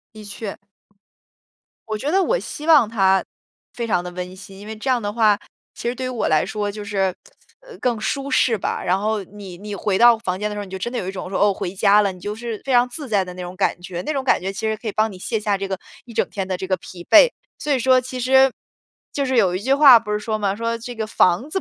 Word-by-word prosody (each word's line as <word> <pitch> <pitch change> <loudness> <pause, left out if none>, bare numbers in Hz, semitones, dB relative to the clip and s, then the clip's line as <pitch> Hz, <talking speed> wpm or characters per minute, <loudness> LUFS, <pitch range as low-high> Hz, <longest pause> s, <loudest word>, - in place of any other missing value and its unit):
的 215 - -10
确。 205 0 -6 1.3
我 215 - -2
觉 275 +7 -3
得 390 - +3
我 - - +1
希 300 - -7
望 300 -9 +6
它 195 -3 +3 0.5
非 240 -1 -3
常 185 -6 0
地 180 - -5
温 180 +1 -6
馨， 195 0 -12
因 200 - -11
为 220 - -6
这 220 +5 -4
样 250 -2 +2
的 205 -1 -3
话， 215 -3 +4 0.4
其 - - -5
实 240 - 0
对 255 +1 -4
于 - - -3
我 245 -3 -1
来 155 -1 +3
说 205 +1 -3
就 210 +1 -7
是， 195 -2 0 0.5
呃， - - -14
更 240 -3 -1
舒 275 +5 -2
适 240 -3 +3
吧。 - - -3
然 185 +2 +1
后 215 -1 -1
你 195 -2 -11
你 205 +2 -7
回 195 0 0
到 240 +1 +7
房 185 -4 -3
间 210 +1 -1
的 210 - -5
时 - - -6
候， - - -4
你 190 - -14
就 190 - -4
真 240 - -3
的 250 - -3
有 185 - -3
一 190 - -2
种 185 -1 -6
说， 190 - -2
哦， 205 -1 +4
回 180 -1 -5
家 205 +1 +5
了， 200 -2 +1
你 185 - -12
就 205 +3 -4
是 230 -1 -5
非 270 - -2
常 245 +1 +4
自 280 +3 -7
在 205 -5 +2
的 180 - -8
那 180 - -7
种 180 +1 -8
感 190 -2 0
觉。 180 -1 -6
那 305 - -3
种 270 -2 -2
感 255 - +2
觉 190 +2 -3
其 195 +3 -7
实 220 - 0
可 225 +1 -8
以 - - -1
帮 215 +1 +1
你 185 - -11
卸 220 +4 -2
下 205 -1 0
这 195 0 -4
个 190 0 -3 0.3
一 235 - -12
整 - - +1
天 195 -2 -4
的 185 -1 -2
这 190 - -5
个 185 - +2
疲 175 0 -11
惫。 410 +10 +8 0.3
所 300 - -2
以 275 - +3
说 255 +1 +4
其 255 0 -6
实 265 +2 +5 0.6
就 280 - -1
是 260 -2 0
有 185 -5 +3
一 185 - -3
句 265 +4 +2
话 275 -5 +8
不 210 -2 -7
是 210 - +1
说 215 0 -2
吗， 200 -1 0
说 230 +1 -2
这 240 +1 -8
个 220 -1 -3
“房 200 - +2
子， 385 - -1
210 Hz, 310 characters per minute, -21 LUFS, 195-245 Hz, 1.3 s, 惫